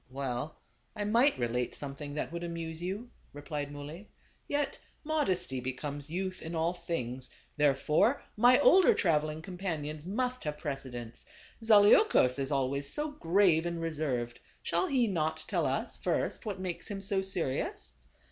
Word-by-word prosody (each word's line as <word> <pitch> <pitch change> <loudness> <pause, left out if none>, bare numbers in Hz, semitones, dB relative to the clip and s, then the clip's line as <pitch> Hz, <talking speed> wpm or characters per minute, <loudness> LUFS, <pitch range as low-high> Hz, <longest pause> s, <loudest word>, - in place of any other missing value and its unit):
" - - -37
Well, 135 +2 -4 0.4
I 210 - -2
might 235 +7 +3
relate 120 0 -1
something 145 0 -6
that 150 - -3
would 170 0 -5
amuse 165 -1 -5
you," 200 +7 -4 0.2
replied 145 0 -5
Muley, 150 +8 -8 0.2
" - - -35
yet 290 -1 -1 0.2
modesty 195 - 0
be 130 +1 -2
comes 145 +2 -6
youth 185 +2 -3
in 165 +1 -5
all 165 +2 +1
things, 130 -8 -4 0.3
therefore 150 - +3
my 245 +3 +6
older 370 +4 +7
traveling 155 -2 +1
companions 165 -4 -4
must 250 +5 -1
have 150 0 -2
precedence. 130 -6 -6 0.4
Zaleukos 205 - +6
is 135 0 -1
always 140 +1 0
so 300 0 -2
grave 175 - +3
and 170 -1 -3
reserved; 145 -8 -2 0.2
shall 370 - +1
he 260 -6 +3
not 160 -5 -1
tell - - +1
us, - - -2
first, - - -1
what 200 -3 -3
makes 185 -2 -4
him 205 -2 -4
so 195 -1 +3
serious 135 - -2
160 Hz, 155 wpm, -31 LUFS, 140-195 Hz, 0.4 s, older